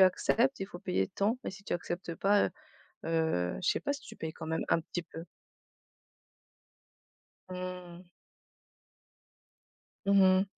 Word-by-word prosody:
acceptes, 225 Hz, +7 st, +4 dB
il 195 Hz, -, -1 dB
faut 175 Hz, -3 st, -9 dB
payer 180 Hz, -, 0 dB
tant 215 Hz, +5 st, +1 dB
et -, -, -2 dB
si 200 Hz, +1 st, -11 dB
tu -, -, -3 dB
acceptes 175 Hz, -1 st, -3 dB
pas, 200 Hz, +4 st, +4 dB
heu, -, -, -4 dB, 0.6 s
heu, 160 Hz, -, +1 dB
je -, -, +1 dB
sais -, -, +1 dB
pas, 285 Hz, -, 0 dB
si 280 Hz, -, -5 dB
tu -, -, -11 dB
payes 160 Hz, -1 st, -4 dB
quand 160 Hz, -, -7 dB
même 160 Hz, 0 st, 0 dB
un 165 Hz, -, +4 dB
petit 175 Hz, +2 st, -4 dB
peu. 165 Hz, 0 st, -8 dB, 2.2 s
Mmh. 180 Hz, -1 st, -6 dB, 2.0 s
Mmh 200 Hz, 0 st, +6 dB
mh. 185 Hz, +1 st, +6 dB
180 Hz, 145 wpm, -32 LUFS, 165-200 Hz, 2.2 s, Mmh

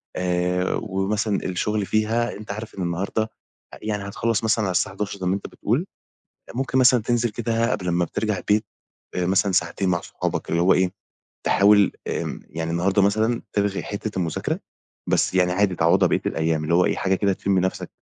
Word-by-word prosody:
آآ، 90 Hz, 0 st, 0 dB
ومثلًا 105 Hz, +1 st, 0 dB
الشُغل 105 Hz, +3 st, -1 dB
فيها 110 Hz, +3 st, +1 dB
أنت 105 Hz, -1 st, -7 dB
عارف 110 Hz, +2 st, -7 dB
إن 95 Hz, -, -3 dB
النهاردة 90 Hz, +5 st, -1 dB, 0.5 s
آآ -, -, -10 dB
يعني 105 Hz, -2 st, -3 dB
هتخلّص 115 Hz, +2 st, -1 dB
مثلًا 110 Hz, 0 st, +2 dB
على 95 Hz, -, 0 dB
الساعة 90 Hz, +2 st, 0 dB
23:00 100 Hz, 0 st, -4 dB
زي 95 Hz, -, -4 dB
مأنت 95 Hz, +2 st, -1 dB
بتقول، 125 Hz, -, -1 dB, 0.7 s
ممكن 130 Hz, 0 st, -1 dB
مثلًا 125 Hz, -2 st, +6 dB
تنزل 120 Hz, +1 st, +1 dB
كده 115 Hz, +1 st, 0 dB
قبل 90 Hz, -6 st, -2 dB
ما 85 Hz, 0 st, +2 dB
بترجع 105 Hz, +1 st, -2 dB
البيت 105 Hz, +4 st, +1 dB, 0.5 s
آآ 90 Hz, -, 0 dB
مثلًا 95 Hz, +2 st, +2 dB
ساعتين 90 Hz, +1 st, +1 dB
مع 85 Hz, -1 st, +2 dB
أصحابك -, -, -4 dB
اللي 85 Hz, -, +1 dB
هو 95 Hz, -, +5 dB
إيه، 90 Hz, 0 st, +2 dB, 0.5 s
تحاول 100 Hz, -1 st, +5 dB, 0.2 s
آمم -, -, -3 dB
يعني 80 Hz, +1 st, -3 dB
النهاردة 95 Hz, +4 st, +2 dB
مثلًا 110 Hz, +4 st, +2 dB
تلغي 100 Hz, -1 st, 0 dB
حتّة 105 Hz, +1 st, -4 dB
المذاكرة، 85 Hz, -3 st, -2 dB, 0.5 s
بس -, -, +2 dB
يعني 90 Hz, -1 st, +3 dB
عادي 95 Hz, 0 st, +2 dB
تعوّضها 85 Hz, 0 st, +4 dB
بقيّة -, -, +1 dB
الأيام 80 Hz, -1 st, 0 dB
اللي 85 Hz, +2 st, +1 dB
هو 90 Hz, -, +5 dB
إيه، -, -, +1 dB
حاجة 95 Hz, 0 st, +1 dB
كده 100 Hz, 0 st, +1 dB
تشم 95 Hz, 0 st, +1 dB
نَفَسك 95 Hz, +1 st, -2 dB
100 Hz, 185 wpm, -23 LUFS, 90-110 Hz, 0.7 s, مثلًا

